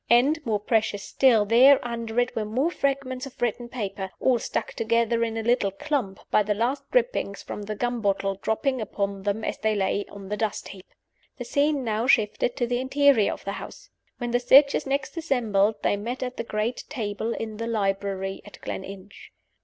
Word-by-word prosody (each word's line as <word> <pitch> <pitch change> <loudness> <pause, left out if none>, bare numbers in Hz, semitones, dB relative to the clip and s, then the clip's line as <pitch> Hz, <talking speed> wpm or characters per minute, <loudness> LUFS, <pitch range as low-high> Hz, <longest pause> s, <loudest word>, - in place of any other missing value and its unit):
And, 280 +7 +4
more 215 -2 +1
precious 210 -1 0
still, 235 -6 +4
there, 255 +6 +7
under 230 -1 -2
it, 245 +1 0
were 220 - 0
more 255 +10 0
fragments 275 -3 -2
of 265 - -15
written 240 0 -1
paper, 195 -5 -4
all 255 -2 +3
stuck - - -3
together 230 +1 +1
in 225 -1 -2
a 225 - -2
little 230 -4 +2 0.2
lump, 215 -10 0
by - - +5
the 210 0 0
last 265 +6 -1
drippings - - 0
from - - -6
the 210 +1 -5
gum 240 +1 -2
bottle 195 -1 +1
dropping 260 +3 0
upon 200 -2 -3
them 205 +2 -2
as - - -3
they 215 0 +1
lay 200 0 0
on 195 -1 -10
the 210 - -2
dust 220 -2 -2
heap! 190 -2 -12 0.5
The 245 - -6
scene 285 +2 +1
now 225 +1 -1
shifted 235 -1 +2
to 240 - 0
the 245 +1 -1
interior 265 -4 +3
of - - -8
the 200 - -2
house. - - -11 0.3
When 240 -1 -3
the 245 - +2
searchers 275 +3 +5
next 275 +4 -2
assembled 220 -10 +1
they 205 - +2
met 240 +6 -4
at 250 0 -4
the - - -2
great 220 +2 -2
table 220 -3 -3
in 220 -1 -5
the 230 +1 -3
library 195 -3 -2
at 205 - -13
Gleninch. 195 +1 -8
230 Hz, 195 wpm, -25 LUFS, 205-255 Hz, 0.5 s, there